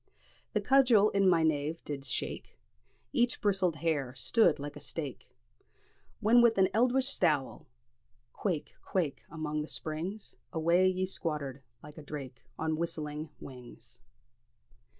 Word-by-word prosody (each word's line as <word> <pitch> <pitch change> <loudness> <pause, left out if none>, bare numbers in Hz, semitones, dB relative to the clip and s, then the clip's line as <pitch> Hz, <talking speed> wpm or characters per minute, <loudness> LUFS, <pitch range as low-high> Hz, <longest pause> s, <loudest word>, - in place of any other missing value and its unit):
The - - +1
cudgel 245 -6 +5
in 195 -1 +4
my 165 -2 +4
nieve 155 +1 0
did 140 -2 -4
shake, - - -4 0.6
Each 245 -3 +2
bristled 190 -6 +2
hair 145 -5 -1
stood 175 - +3
like 145 +1 -6
a - - -8
stake, 145 -1 -6 0.9
When 235 +3 +6
wi' 235 - +7
an 190 -1 +5
eldritch 250 +4 +3
stour, 155 - +1 0.7
'quaick! 175 -7 -2
quaick!' 170 -7 -1
Among 155 -1 -3
the 150 - -5
springs 170 +9 -3 0.2
Awa' 170 +3 +3
ye 185 0 -1
squattered, 150 -7 -3 0.2
like 150 +1 -11
a - - -8
drake, 140 -4 -8 0.2
On 160 0 -1
whistling 155 -2 -3
wings." 125 -3 -5
160 Hz, 130 wpm, -31 LUFS, 150-195 Hz, 0.9 s, wi